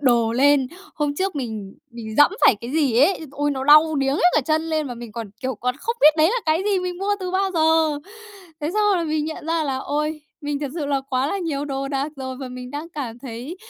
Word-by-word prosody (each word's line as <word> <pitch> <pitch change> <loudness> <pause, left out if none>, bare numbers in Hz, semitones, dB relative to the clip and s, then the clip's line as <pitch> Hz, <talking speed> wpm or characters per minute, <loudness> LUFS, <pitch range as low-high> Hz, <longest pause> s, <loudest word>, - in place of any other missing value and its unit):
đồ 235 -4 +3
lên. 275 +1 +4 0.3
Hôm 295 -2 -1
trước 380 0 -2
mình 220 -7 -5 0.2
mình 225 -2 -8
giẫm 290 - +7 0.2
phải - - +7
cái 235 - -6
gì 280 -7 +2
ấy. 360 +7 +3
Ôi! 290 +1 -1
Nó 265 -1 -3
đau 305 +2 +6
điếng 275 0 +1
hết - - -1
cả 305 - +4
chân 315 0 +2
lên, 310 -2 0
mà 245 - -5
mình 235 -2 -9
còn, 230 -3 -6
kiểu, 260 0 -1
còn 250 +3 -2
không 465 +10 -3
biết 305 +1 +7
đấy 315 +1 +5
là - - 0
cái 315 +3 +2
gì, 405 -2 +2
mình 360 -1 -4
mua 400 +2 0
từ 365 -1 -3
bao 385 +1 +1
giờ! 320 -2 +3 0.6
Thế 300 +1 -2
xong 425 - +2
là 340 - -1
mình 310 -1 -1
nhận 315 0 -6
ra 325 0 +1
là, 270 -2 -1
ôi, 300 +3 -2 0.2
mình 290 -1 -3
thật 290 - -2
sự 315 -4 -3
là 280 -1 0
quá 260 0 +1
là 395 - -2
nhiều 305 -6 -2
đồ 275 -1 -3
đạc 275 +2 -2
rồi, 260 -1 -5
và 265 -1 -6
mình 250 0 -8
đang 295 +4 -6
cảm 260 -8 -6
thấy 250 +6 -7
290 Hz, 255 wpm, -22 LUFS, 260-315 Hz, 0.6 s, giẫm